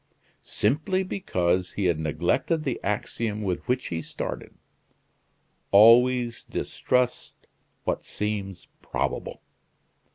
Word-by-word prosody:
Simply 155 - 0
because 90 - -1
he 100 - -1
had 85 -3 +2
neglected 85 - 0
the 135 -4 -2
axiom 105 +1 -2
with 90 -3 -1
which 125 0 0
he 80 -1 -2
started: - - -6 1.1
"Always 120 +3 +6
distrust 125 -1 -1 0.4
what - - -1
seems 100 -3 -4
probable!" - - -3
105 Hz, 95 wpm, -26 LUFS, 90-125 Hz, 1.1 s, Always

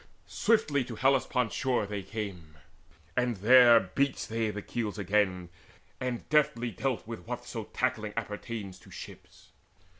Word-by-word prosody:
Swiftly 155 - +2
to 120 -1 -7
Hellespont's 125 -2 +2
shore 130 -6 0
they 100 0 -4
came, 90 -7 -7 0.6
and 125 -3 +1
there 120 +3 +8
Beached 125 +9 -1
they 115 -1 0
the 105 -1 -5
keels 110 -3 -3
again, 95 -3 +1 0.5
and 125 -2 -3
deftly 125 -6 +2
dealt 125 +4 -2
With 115 0 -8
whatso 120 -2 -5
tackling 110 -4 -2
appertains 105 -3 -5
to - - -17
ships. - - -12
115 Hz, 130 wpm, -30 LUFS, 105-125 Hz, 0.6 s, there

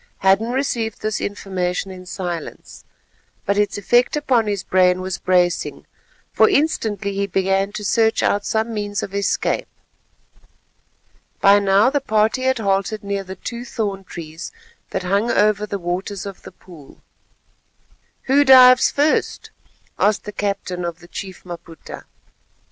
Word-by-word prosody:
Hadden 195 +4 +3
received 240 -5 -2
this 215 0 -2
information 190 -2 -3
in 185 -1 -11
silence, 175 -3 -6 0.6
but 200 - +1
its 205 0 0
effect 240 +7 +2
upon 250 -7 +1
his 200 -2 -2
brain 185 -1 +3
was 185 0 -4
bracing, 180 -1 0 0.5
for - - +5
instantly 220 - 0
he 200 0 -1
began 195 +1 0
to 210 - -5
search 225 +2 +2
out 205 0 +1
some 220 +2 -1
means 205 -1 -3
of 195 - -6
escape. 200 0 -1 1.7
By 200 +1 +6
now 200 +5 +3
the 285 0 0
party 220 +1 +1
had 260 0 +1
halted 200 0 -1
near 200 0 -3
the 190 0 -8
two 235 +5 -6
thorn 205 -6 -4
trees 165 -2 -8 0.4
that 190 - -3
hung 200 +5 +1
over 210 -1 +2
the 200 - -3
waters 185 +2 -4
of 195 -2 -8
the - - -11
pool. 160 -7 -16 1.2
"Who 280 +2 +4
dives 255 -2 +7
first," 295 +2 0 0.5
asked 210 0 +2
the 210 - -7
captain 195 -3 -3
of 170 -1 -4
the 175 0 -16
Chief 190 +1 -8
Maputa. 170 -2 -10
200 Hz, 145 wpm, -20 LUFS, 185-220 Hz, 1.7 s, dives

